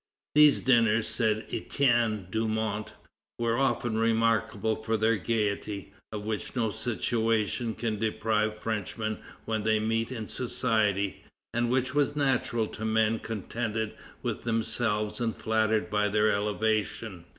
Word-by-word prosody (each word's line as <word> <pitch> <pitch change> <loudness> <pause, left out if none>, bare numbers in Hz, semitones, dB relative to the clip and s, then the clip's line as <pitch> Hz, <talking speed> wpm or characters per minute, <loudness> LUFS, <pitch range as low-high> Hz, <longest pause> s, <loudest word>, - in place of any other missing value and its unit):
"These 150 -1 +6
dinners," 115 -3 +4
says 110 -2 +1
Etienne 120 -7 +1
Dumont, 110 -1 -1 0.4
"were 115 -1 +1
often 120 -4 +1
remarkable 115 -1 +2
for 110 +1 -1
their 110 +1 +3
gaiety, 100 -2 -2 0.2
of 105 -1 -5
which 110 -1 -3
no 115 -3 +1
situation 115 0 0
can 110 -3 -2
deprive 110 0 0
Frenchmen 110 0 -3 0.3
when 110 -1 -1
they 110 0 +2
meet 115 +2 0
in 115 -4 -4
society, 105 -5 0 0.3
and 120 0 +1
which 130 +1 +1
was 145 0 +2
natural 130 -5 +1
to 110 - -7
men 110 0 +2
contented 110 0 -3 0.3
with - - -2
themselves 110 -1 0
and 115 -2 0
flattered 110 0 +1
by 105 0 +2
their 105 +1 +3
elevation. 105 -2 -1
110 Hz, 130 wpm, -28 LUFS, 110-115 Hz, 0.4 s, These